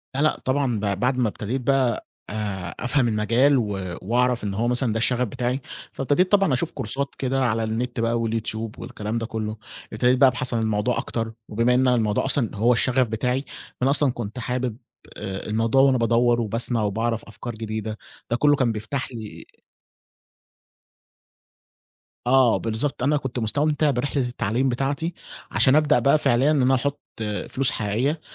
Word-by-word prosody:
لأ، 140 Hz, -, 0 dB
لأ، 155 Hz, -, +2 dB
طبعًا 130 Hz, -4 st, +1 dB
ب 100 Hz, -2 st, -1 dB
بعد 125 Hz, +1 st, +1 dB
ما 125 Hz, -3 st, +2 dB
ابتديت 115 Hz, +6 st, -4 dB
بقى 130 Hz, -3 st, +1 dB, 0.2 s
آآ، 100 Hz, -4 st, -4 dB
أفهم 125 Hz, 0 st, +2 dB
المجال 115 Hz, +6 st, +3 dB
و 95 Hz, -6 st, -2 dB
وأعرف 120 Hz, +3 st, +1 dB
إن 100 Hz, -, -2 dB
هو 115 Hz, +4 st, 0 dB
مثلًا 125 Hz, -2 st, +1 dB
ده -, -, -1 dB
الشغف 125 Hz, +2 st, +1 dB
بتاعي، 125 Hz, +3 st, -2 dB, 0.3 s
فابتديت 145 Hz, +8 st, +1 dB
طبعًا 195 Hz, -7 st, +4 dB
أشوف 155 Hz, +6 st, -1 dB
كورسات 135 Hz, +6 st, -3 dB
كده 135 Hz, 0 st, 0 dB
على 115 Hz, -1 st, 0 dB
النت 115 Hz, +2 st, -3 dB
بقى 115 Hz, +1 st, +1 dB
والYouTube 110 Hz, -1 st, -3 dB
والكلام 105 Hz, +2 st, -4 dB
ده 115 Hz, -, -2 dB
كلّه، 110 Hz, -1 st, -4 dB, 0.4 s
ابتديت 125 Hz, +3 st, +3 dB
بقى 135 Hz, 0 st, +7 dB
أبحث 125 Hz, 0 st, -2 dB
الموضوع 110 Hz, +1 st, 0 dB
أكتر 115 Hz, -1 st, -3 dB, 0.2 s
وبما 115 Hz, +3 st, +2 dB
إن 130 Hz, +1 st, +3 dB
الموضوع 110 Hz, -3 st, +1 dB
أصلًا 135 Hz, -5 st, +2 dB
هو 115 Hz, +4 st, +3 dB
الشغف 125 Hz, +1 st, +2 dB
بتاعي، 125 Hz, +5 st, -1 dB, 0.3 s
فأنا 130 Hz, +2 st, +2 dB
أصلًا 145 Hz, -1 st, +4 dB
كنت 120 Hz, 0 st, -6 dB
حابب 125 Hz, -1 st, -2 dB, 0.4 s
آآ، 95 Hz, -2 st, -5 dB
الموضوع 115 Hz, +5 st, +2 dB
وأنا 135 Hz, -1 st, +4 dB
بادوّر 120 Hz, +1 st, +2 dB
وباسمع 115 Hz, +1 st, 0 dB
وباعرف 115 Hz, +2 st, -1 dB
أفكار 115 Hz, +2 st, -7 dB
جديدة، 110 Hz, -1 st, -4 dB, 0.3 s
ده -, -, +3 dB
كلّه 145 Hz, +2 st, +4 dB
كان 130 Hz, -4 st, +1 dB
بيفتح 115 Hz, +6 st, -4 dB
لي 110 Hz, -4 st, -9 dB, 2.8 s
آه، 130 Hz, -2 st, +5 dB
بالضبط 115 Hz, +4 st, -2 dB
أنا 145 Hz, +3 st, +3 dB
كنت 130 Hz, -3 st, -4 dB
مستمتع 145 Hz, +6 st, +1 dB
برحلة 135 Hz, +2 st, -1 dB
التعليم 120 Hz, +2 st, -1 dB
بتاعتي، 140 Hz, +7 st, -1 dB, 0.4 s
عشان 130 Hz, 0 st, +4 dB
ابدأ 150 Hz, -1 st, +4 dB
بقى 140 Hz, +2 st, +4 dB
فعليًا 135 Hz, 0 st, +3 dB
إن 150 Hz, -3 st, +2 dB
أنا 130 Hz, +1 st, +4 dB
أحط 140 Hz, +3 st, -2 dB, 0.5 s
فلوس 135 Hz, -1 st, +3 dB
حقيقية، 120 Hz, +9 st, -1 dB
120 Hz, 165 wpm, -23 LUFS, 110-135 Hz, 2.8 s, بقى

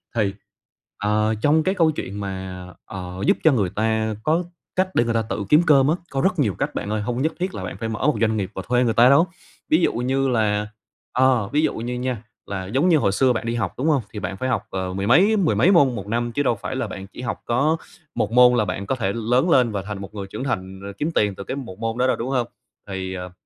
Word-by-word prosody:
thì 100 Hz, -4 st, +1 dB, 0.6 s
ờ, 105 Hz, +1 st, +1 dB
trong 155 Hz, +4 st, +3 dB
cái 190 Hz, +3 st, 0 dB
câu 165 Hz, -4 st, +3 dB
chuyện 100 Hz, -8 st, -6 dB
mà, 95 Hz, -2 st, -5 dB, 0.2 s
ờ, 90 Hz, -2 st, -7 dB
giúp -, -, +4 dB
cho 160 Hz, -, +6 dB
người 100 Hz, -8 st, +1 dB
ta 110 Hz, +1 st, 0 dB
có 165 Hz, +3 st, +2 dB, 0.3 s
cách 185 Hz, 0 st, +1 dB
để -, -, +4 dB
người 115 Hz, -1 st, -1 dB
ta 115 Hz, -, +2 dB
tự 105 Hz, -1 st, -4 dB
kiếm 150 Hz, +3 st, +6 dB
cơm 140 Hz, -3 st, +6 dB
á, 160 Hz, -, +3 dB, 0.2 s
có 135 Hz, -1 st, -1 dB
rất 190 Hz, -3 st, +1 dB
nhiều 110 Hz, -9 st, +2 dB
cách -, -, -3 dB
bạn 100 Hz, -, -3 dB
ơi, 105 Hz, 0 st, -1 dB
hông 120 Hz, +4 st, -2 dB
nhất 160 Hz, +2 st, 0 dB
thiết 185 Hz, +2 st, -2 dB
là -, -, -5 dB
bạn -, -, -6 dB
phải 115 Hz, -, -4 dB
mở 110 Hz, -, -4 dB
một 150 Hz, -, +2 dB
doanh 110 Hz, -1 st, +2 dB
nghiệp 95 Hz, -2 st, -3 dB
và 95 Hz, -, -3 dB
thuê 125 Hz, 0 st, +3 dB
người 115 Hz, -2 st, +1 dB
ta 120 Hz, +2 st, +6 dB
đâu. 150 Hz, +6 st, +5 dB, 0.4 s
Ví 155 Hz, -, +5 dB
dụ -, -, +2 dB
như 135 Hz, +3 st, 0 dB
là, 105 Hz, -3 st, +1 dB, 0.5 s
ờ, 125 Hz, -5 st, +3 dB
ví 150 Hz, -, +3 dB
dụ -, -, +1 dB
như 120 Hz, +2 st, -4 dB
nha 125 Hz, -3 st, -3 dB, 0.2 s
là 95 Hz, -2 st, -4 dB
giống 135 Hz, -, +2 dB
như 165 Hz, -, +5 dB
hồi 100 Hz, -8 st, +2 dB
xưa 125 Hz, +4 st, +3 dB
bạn 115 Hz, -, -3 dB
đi 115 Hz, +1 st, -1 dB
học, 110 Hz, -6 st, -2 dB
đúng 140 Hz, +5 st, -1 dB
hông? 145 Hz, -4 st, +3 dB
Thì 105 Hz, -, -4 dB
bạn 95 Hz, 0 st, -4 dB
phải 130 Hz, +3 st, -2 dB
học, 110 Hz, -5 st, 0 dB
ờ, 95 Hz, -1 st, -3 dB
mười 100 Hz, +1 st, -2 dB
mấy 200 Hz, -, +5 dB
mười 180 Hz, -6 st, +2 dB
mấy 190 Hz, -, +4 dB
môn 140 Hz, -9 st, +4 dB
1 100 Hz, -1 st, -6 dB
năm 120 Hz, +2 st, -1 dB
chứ 145 Hz, +4 st, 0 dB
đâu 120 Hz, -, +2 dB
phải 115 Hz, +6 st, -5 dB
là 125 Hz, -4 st, -2 dB
bạn 95 Hz, 0 st, -8 dB
chỉ 115 Hz, -, -10 dB
học 120 Hz, -, -4 dB
có 140 Hz, +7 st, +2 dB, 0.4 s
1 105 Hz, -, 0 dB
môn 125 Hz, 0 st, +7 dB
là 110 Hz, -, +2 dB
bạn 95 Hz, +1 st, -4 dB
có 135 Hz, -, -1 dB
thể 100 Hz, -5 st, -1 dB
lớn 125 Hz, +8 st, +1 dB
lên 125 Hz, -6 st, +4 dB
và 100 Hz, -2 st, -2 dB
thành 100 Hz, -1 st, -6 dB
một 100 Hz, -, -9 dB
người 100 Hz, -2 st, -6 dB
trưởng 105 Hz, +6 st, -6 dB
thành 95 Hz, -7 st, -3 dB
r -, -, -9 dB
kiếm 160 Hz, +3 st, -1 dB
tiền 105 Hz, -2 st, +2 dB
từ 100 Hz, -, -7 dB
cái 130 Hz, -, -4 dB
1 115 Hz, -9 st, -7 dB
môn 115 Hz, +1 st, -2 dB
đó 130 Hz, +1 st, +2 dB
đâu, -, -, +2 dB
đúng 120 Hz, +3 st, -4 dB
hông? 125 Hz, -3 st, 0 dB, 0.4 s
Thì, 95 Hz, -1 st, -4 dB
ờ, 90 Hz, -1 st, -6 dB
115 Hz, 275 wpm, -22 LUFS, 100-135 Hz, 0.6 s, môn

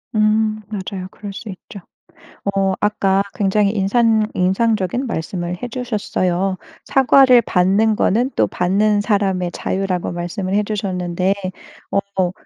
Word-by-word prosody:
음 215 Hz, 0 st, +2 dB
맞아요. 190 Hz, -2 st, -5 dB
그럴 205 Hz, -1 st, -8 dB
수 205 Hz, +3 st, -9 dB
있죠. 195 Hz, +2 st, -10 dB, 0.8 s
어 195 Hz, -1 st, +2 dB
아까 195 Hz, -2 st, +2 dB
굉장히 200 Hz, 0 st, +2 dB
인산 220 Hz, +2 st, +2 dB
인상적인 210 Hz, +5 st, 0 dB
말씀을 175 Hz, -2 st, -3 dB
해주셨어요. 200 Hz, -6 st, -1 dB, 0.3 s
"사과를 265 Hz, -1 st, +5 dB
받는 200 Hz, +4 st, +2 dB
거는 240 Hz, +6 st, +1 dB
또 -, -, +3 dB
받는 205 Hz, +4 st, +1 dB
사람의 195 Hz, -4 st, 0 dB
자유."라고 190 Hz, -2 st, -2 dB
말씀을 180 Hz, +3 st, -4 dB
해 210 Hz, +1 st, +2 dB
주셨는데 185 Hz, -3 st, -1 dB, 0.8 s
어 180 Hz, -2 st, +2 dB
200 Hz, 265 characters per minute, -19 LUFS, 185-215 Hz, 0.8 s, 사과를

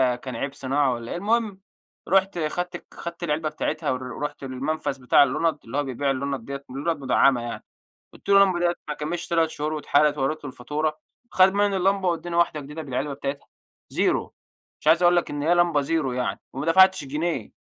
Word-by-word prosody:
كان 125 Hz, 0 st, -7 dB
عيب 140 Hz, +4 st, -3 dB
صناعة 135 Hz, 0 st, +1 dB
والّا 120 Hz, -1 st, -6 dB
إيه. -, -, -3 dB
المهم، 210 Hz, 0 st, 0 dB, 0.5 s
رُحت 190 Hz, -1 st, +2 dB
خدت 175 Hz, +3 st, -2 dB
ك -, -, -22 dB
خدت 170 Hz, 0 st, -7 dB
العلبة 155 Hz, -1 st, -1 dB
بتاعتها، 155 Hz, -1 st, -2 dB
ورُحت 130 Hz, +3 st, -5 dB
المنفذ 135 Hz, +1 st, -3 dB
بتاع 125 Hz, +3 st, +6 dB
اللُنض، 155 Hz, +3 st, 0 dB
اللي 115 Hz, +5 st, -4 dB
هو 145 Hz, -, +2 dB
بيبيع 135 Hz, +1 st, -1 dB
اللُنض 135 Hz, -2 st, -3 dB
ديّة 140 Hz, 0 st, -6 dB
اللُنض 145 Hz, +5 st, -2 dB
مدعمة 130 Hz, -1 st, +3 dB
يعني. 120 Hz, 0 st, -6 dB, 0.5 s
قلت -, -, -17 dB
له: 200 Hz, -, +6 dB
"اللمبة 185 Hz, -3 st, +2 dB
ديّة 175 Hz, 0 st, +1 dB
ما 150 Hz, -, -2 dB
كملتش 160 Hz, +3 st, -4 dB
3 165 Hz, -1 st, +2 dB
شهور 150 Hz, 0 st, -3 dB
واتحرقت"، 150 Hz, -1 st, +2 dB
ووريت 145 Hz, +3 st, -1 dB
له 145 Hz, -, -5 dB
الفاتورة. 155 Hz, +5 st, -3 dB, 0.3 s
خد 190 Hz, 0 st, +5 dB
مني 205 Hz, -1 st, +2 dB
اللمبة، 190 Hz, 0 st, +2 dB
واداني 170 Hz, 0 st, -2 dB
واحدة 170 Hz, -3 st, +2 dB
جديدة 150 Hz, +3 st, -7 dB
بالعلبة 135 Hz, +1 st, -3 dB
بتاعتها، 140 Hz, 0 st, -5 dB, 0.4 s
زيرو. -, -, 0 dB, 0.5 s
مش -, -, -18 dB
عايز 165 Hz, +3 st, +5 dB
أقول 175 Hz, 0 st, +5 dB
لك 175 Hz, -, 0 dB
إن 145 Hz, 0 st, -4 dB
هي 170 Hz, +3 st, +3 dB
لمبة 175 Hz, -4 st, +3 dB
زيرو 140 Hz, -2 st, -1 dB
يعني، 125 Hz, 0 st, -2 dB
وما 135 Hz, +4 st, -4 dB
دفعتش 190 Hz, +1 st, +5 dB
جنيه. 150 Hz, -3 st, -3 dB
150 Hz, 195 wpm, -24 LUFS, 135-175 Hz, 0.5 s, بتاع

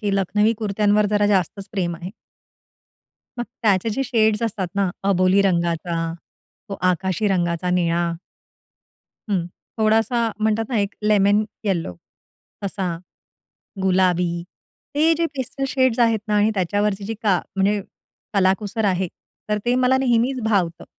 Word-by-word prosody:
की 205 Hz, -3 st, 0 dB
लखनवी 210 Hz, +3 st, +2 dB
कुर्त्यांवर 210 Hz, 0 st, +2 dB
जरा 205 Hz, 0 st, +3 dB
जास्तच 195 Hz, 0 st, 0 dB
प्रेम 175 Hz, -4 st, -1 dB
आहे. 175 Hz, +3 st, -7 dB, 1.3 s
मग 240 Hz, -, -1 dB, 0.2 s
त्याचे 205 Hz, 0 st, +2 dB
जे 270 Hz, +6 st, -1 dB
शेड्स 220 Hz, -2 st, +2 dB
असतात 200 Hz, -4 st, -1 dB
ना, 195 Hz, -2 st, +1 dB, 0.2 s
अबोली 185 Hz, +1 st, +4 dB
रंगाचा, 170 Hz, -2 st, 0 dB, 0.6 s
तो 200 Hz, -, -4 dB, 0.2 s
आकाशी 190 Hz, +3 st, -1 dB
रंगाचा 175 Hz, -1 st, 0 dB
निळा 170 Hz, -1 st, +1 dB, 1.2 s
हं. 175 Hz, -4 st, 0 dB, 0.3 s
थोडासा 225 Hz, +2 st, +2 dB
म्हणतात 220 Hz, +1 st, +1 dB
ना, 235 Hz, -4 st, 0 dB
एक 200 Hz, +1 st, -1 dB
लेमन 210 Hz, 0 st, +3 dB, 0.2 s
येलो 170 Hz, -, -1 dB, 0.7 s
तसा, 190 Hz, -2 st, -2 dB, 0.9 s
गुलाबी. 180 Hz, -2 st, +2 dB, 0.5 s
ते 315 Hz, +3 st, +4 dB
जे 335 Hz, -, +2 dB
पेस्टल 270 Hz, +1 st, -3 dB
शेड्स 260 Hz, -3 st, +1 dB
आहेत 230 Hz, -2 st, +4 dB
ना 210 Hz, -, +2 dB
आणि 210 Hz, +1 st, +3 dB
त्याच्यावरची 205 Hz, +2 st, 0 dB
जी 225 Hz, +2 st, -3 dB
का 195 Hz, -5 st, +3 dB, 0.2 s
म्हणजे 200 Hz, +1 st, +2 dB, 0.5 s
कलाकुसर 200 Hz, +3 st, +1 dB
आहे. 185 Hz, -2 st, +1 dB, 0.4 s
तर 210 Hz, 0 st, +1 dB
ते 245 Hz, -, +3 dB
मला 255 Hz, +1 st, +3 dB
नेहमीच 250 Hz, 0 st, +1 dB
भावतं. 185 Hz, -7 st, 0 dB
200 Hz, 130 wpm, -22 LUFS, 185-220 Hz, 1.3 s, अबोली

